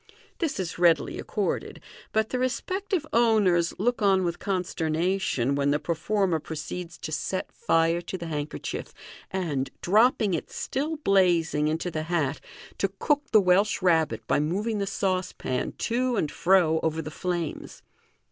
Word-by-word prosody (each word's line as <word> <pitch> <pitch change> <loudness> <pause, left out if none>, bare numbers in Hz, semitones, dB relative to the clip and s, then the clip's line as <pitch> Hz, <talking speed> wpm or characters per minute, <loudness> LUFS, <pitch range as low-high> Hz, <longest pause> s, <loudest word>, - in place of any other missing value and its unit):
This 320 - -1
is 180 -1 -4
readily 170 -3 +3
accorded, 205 -2 -2 0.4
out 220 0 +2
the 255 - -2
respective 370 - -1
owners 205 -8 +3
look 240 +3 0
on 195 -2 +4
with 170 -1 -2
consternation 175 -6 0
when 140 0 +1
the 145 - +3
performer 170 +3 0
proceeds 165 +3 -6
to 155 - -6
set 185 +4 -3
fire 165 -5 +1
to 180 +2 -5
the 170 - -6
handkerchief, 150 -2 -5 0.3
and, 160 -8 -2
dropping 215 +1 +4
it 165 - -3
still 300 +4 -3
blazing 175 - +2
into 160 +3 -1
the 155 - -2
hat, 155 -5 0 0.4
to 195 - +1
cook 290 +3 +1
the 215 - +7
Welsh 195 +2 +2
Rabbit 160 -11 +2
by - - +2
moving 205 +8 -1
the 200 - -1
saucepan 185 -9 -2
to 245 +1 0
and 155 -8 0
fro 175 -3 +3
over 160 0 -1
the 155 -1 -5
flames. 175 -1 -4
180 Hz, 145 wpm, -26 LUFS, 160-210 Hz, 0.4 s, the